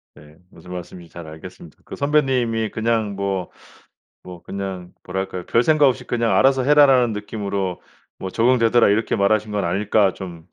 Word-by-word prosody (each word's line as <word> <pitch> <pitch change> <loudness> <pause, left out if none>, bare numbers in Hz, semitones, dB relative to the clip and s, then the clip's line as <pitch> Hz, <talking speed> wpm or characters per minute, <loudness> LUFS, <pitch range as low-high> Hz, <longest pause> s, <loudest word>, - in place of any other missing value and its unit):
네. 75 +1 -17
무슨 90 - -15
말씀인지 90 -1 -9
잘 85 -2 -10
알겠습니다. 80 -2 -12
그 - - -8
선배님이 130 -6 0
그냥 110 -2 -1
뭐 95 -2 -3 0.7
뭐 90 -2 -11
그냥 95 -2 -6
뭐랄까요 95 -1 -5
'별생각 145 +4 +3
없이 130 -1 -1
그냥 115 -2 0
'알아서 135 0 +4
해라.'라는 135 -4 +5
느낌으로 100 -3 -4 0.4
뭐 95 - -5
"적응되더라." 115 +1 +3
이렇게 105 +3 +1
말하신 105 +2 +1
건 100 -3 -1
아닐까.' 100 +1 +1
좀 85 -4 -9
105 Hz, 360 characters per minute, -21 LUFS, 90-120 Hz, 0.7 s, 해라.'라는